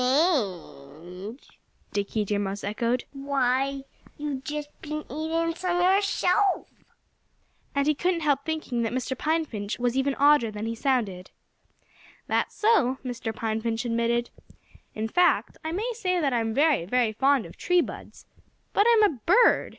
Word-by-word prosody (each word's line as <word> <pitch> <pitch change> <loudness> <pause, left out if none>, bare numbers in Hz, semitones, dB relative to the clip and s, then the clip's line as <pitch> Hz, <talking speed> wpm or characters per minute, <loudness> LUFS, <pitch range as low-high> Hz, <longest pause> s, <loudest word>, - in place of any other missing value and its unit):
"Strange!" 200 - -2 0.3
Dickie 205 +1 -1
Deer 205 0 -1
Mouse 200 0 -3
echoed. 235 +4 -1
"Why, 275 0 0 0.3
you've 290 -3 -4
just 295 +1 -5
been 305 0 -5
eating 325 +3 -1
some 355 +1 -1
yourself!" 385 +1 +2 1.1
And 280 0 +2
he 305 - +3
couldn't 345 +3 0
help 285 -3 +1
thinking 310 -7 -2
that 230 0 -1
Mr. 255 +1 -2
Pine 320 +4 0
Finch 205 -6 -5
was 245 0 0
even 270 +1 +1
odder 285 -4 +4
than 210 0 -5
he 230 - -2
sounded. 225 -8 -1 1.0
"That's - - -1
so," 365 - +3
Mr. 245 -2 -3
Pine 220 0 -2
Finch 230 +1 -2
admitted. 235 0 0 0.6
"In 220 +1 -2
fact, 355 +10 +2
I 320 - -3
may 430 +8 -2
say 365 -5 0
that 280 -5 +1
I'm 225 -2 0
very, 285 - +2
very 235 +2 +1
fond 270 +1 +2
of - - -12
tree 360 -1 +2
buds. - - -8 0.5
But 410 +3 +4
I'm 455 -2 +5
a 320 - +2
bird. 455 +7 +5
270 Hz, 150 wpm, -26 LUFS, 225-320 Hz, 1.1 s, I'm